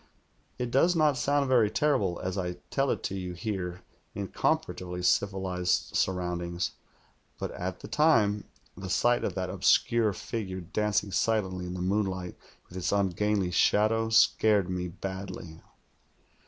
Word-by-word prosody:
It 125 -1 -3
does 170 +8 +4
not 155 -3 +3
sound 140 +2 +1
very 120 -5 +4
terrible, 105 -11 +1
as 95 0 -2
I 90 -2 -2 0.2
tell 135 0 +1
it - - -1
to 95 - -3
you 90 -2 -4
here 90 -1 -4 0.3
in 100 -2 -4
comparatively 90 -1 -1
civilized 95 -2 0
surroundings; 90 -1 -1 0.7
but - - -4
at 90 +1 -5
the - - -8
time, 110 -10 +3 0.3
the 95 0 -7
sight 120 +6 +2
of - - -2
that - - -2
obscure 115 -2 +3
figiu*e 95 -1 -5
dancing 105 -1 +1
silently 95 -3 0
in 90 - -5
the 90 - -3
moonlight 95 -2 -1 0.3
with 90 - -7
its 90 - -1
ungainly 100 -1 +1
shadow 110 +5 +3
scared 105 -4 +4
me 90 0 -2
badly. 95 -2 -7
95 Hz, 140 wpm, -28 LUFS, 90-110 Hz, 0.7 s, does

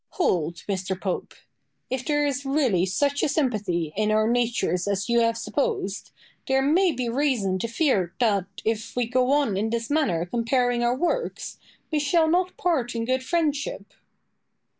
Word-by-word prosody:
Boileau. 365 - +3
Hold, 170 -1 -1
Mr. 190 -1 -2
Pope. 190 -2 -4 0.6
If 260 -1 -2
there 295 0 +1
is 280 -2 -1
really 265 - +1
such 285 +9 0
a - - +1
sympathy 205 - -1
in 215 +1 +1
our 215 0 +3
natures 235 -6 0
as 200 0 -1
you 235 0 +4
have 230 0 +2
supposed, 395 - -2 0.4
there 265 -1 +2
may 345 +6 +3
be 250 -4 -3
reason 235 -7 0
to 230 - -2
fear 225 - 0
that, 200 -6 +2 0.2
if 225 0 -2
we 245 -1 +1
go 250 +2 +1
on 280 -7 +2
in 215 +3 0
this 230 +2 -3
manner 260 - +1
comparing 240 +4 0
our 240 +1 +2
works, 355 - -2 0.3
we 305 - +1
shall 320 +3 +3
not 360 +3 +1
part 270 -10 0
in 230 0 -1
good 260 +2 0
friendship. 290 - -2
245 Hz, 170 wpm, -25 LUFS, 205-285 Hz, 0.6 s, you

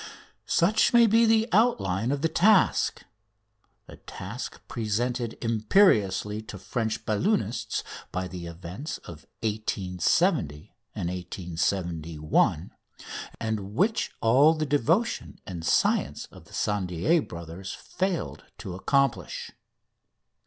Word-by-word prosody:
Such 195 +8 +3
may 235 -1 +7
be 225 +1 +4
the 220 0 +4
outline 115 - +2
of 145 0 -2
the - - +4
task 190 +5 +3 0.8
a - - -12
task - - -7
presented 120 +2 -2
imperiously 110 - +3
to 110 -2 -9
French 110 +3 -3
balloonists 115 - 0 0.3
by 95 0 -2
the 90 -2 -7
events 90 - -6
of 80 -2 -11 0.2
1870 90 -3 -2
1, 75 0 +1 0.7
and 110 -3 -3
which 215 - +1
all 135 +8 +5
the 155 -1 -1
devotion 150 - 0
and 85 -4 -6
science 75 -3 +1
of - - -14
the - - -21
Tissandier 105 - +1
brothers 85 - -8
failed 185 -3 -3
to 95 - -7
accomplish. 110 - 0
110 Hz, 105 wpm, -27 LUFS, -, 0.8 s, may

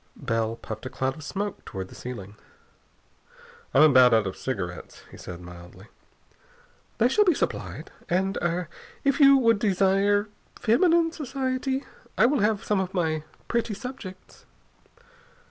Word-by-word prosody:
Bell 115 0 -1
puffed 110 +1 -7
a - - -6
cloud 130 +1 -2
of 155 - -11
smoke 200 +6 -4
toward 95 -2 -7
the - - -13
ceiling. 105 -5 -8 1.4
"I'm 140 - +6
about 130 -5 +7
out 110 -2 +2
of 95 - -4
cigarettes," 95 -9 -5
he - - -12
said 90 -1 -9
mildly. 90 +4 -13 1.1
"They 235 - +4
shall 420 +11 +4
be 355 -6 +3
supplied. - - -4 0.2
And 190 +2 +1
er 175 0 -1 0.4
if 275 +3 +2
you 275 -1 +8
would 230 -5 +3
desire 200 +1 +2 0.3
feminine 330 +8 +3
society, 265 -2 -2 0.3
I - - +6
will 275 +2 +2
have 210 0 +1
some 210 -2 +1
of 190 0 -3
my 160 -3 0 0.2
pretty 235 -3 -1
subjects...." 195 -7 -10
190 Hz, 145 wpm, -26 LUFS, -, 1.4 s, you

